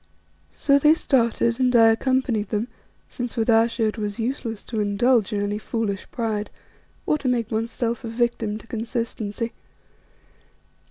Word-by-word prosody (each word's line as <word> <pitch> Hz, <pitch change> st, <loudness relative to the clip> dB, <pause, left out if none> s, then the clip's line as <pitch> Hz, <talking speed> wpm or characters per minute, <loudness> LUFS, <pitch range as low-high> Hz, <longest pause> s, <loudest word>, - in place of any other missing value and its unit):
So 280 Hz, -, +2 dB
they 300 Hz, +2 st, +6 dB
started, 235 Hz, -4 st, +1 dB
and 250 Hz, -1 st, +2 dB
I 225 Hz, -1 st, +7 dB
accompanied 230 Hz, -3 st, +1 dB
them 220 Hz, +3 st, -1 dB, 0.4 s
since 245 Hz, -1 st, -5 dB
with 225 Hz, +1 st, +2 dB
Ayesha 225 Hz, 0 st, +3 dB
it 215 Hz, -, -7 dB
was 210 Hz, +1 st, -3 dB
useless 230 Hz, -2 st, -3 dB
to 225 Hz, -, -4 dB
indulge 210 Hz, +2 st, +2 dB
in 205 Hz, -1 st, -1 dB
any 205 Hz, +1 st, -2 dB
foolish 215 Hz, -3 st, -3 dB
pride, 215 Hz, -3 st, -2 dB, 0.6 s
or 305 Hz, -, +1 dB
to 265 Hz, -, -3 dB
make 235 Hz, -3 st, 0 dB
oneself 230 Hz, +2 st, -2 dB
a 230 Hz, -, -4 dB
victim 230 Hz, -2 st, -1 dB
to 220 Hz, -, -13 dB
consistency. 230 Hz, -1 st, -4 dB
230 Hz, 150 wpm, -23 LUFS, 215-245 Hz, 0.6 s, I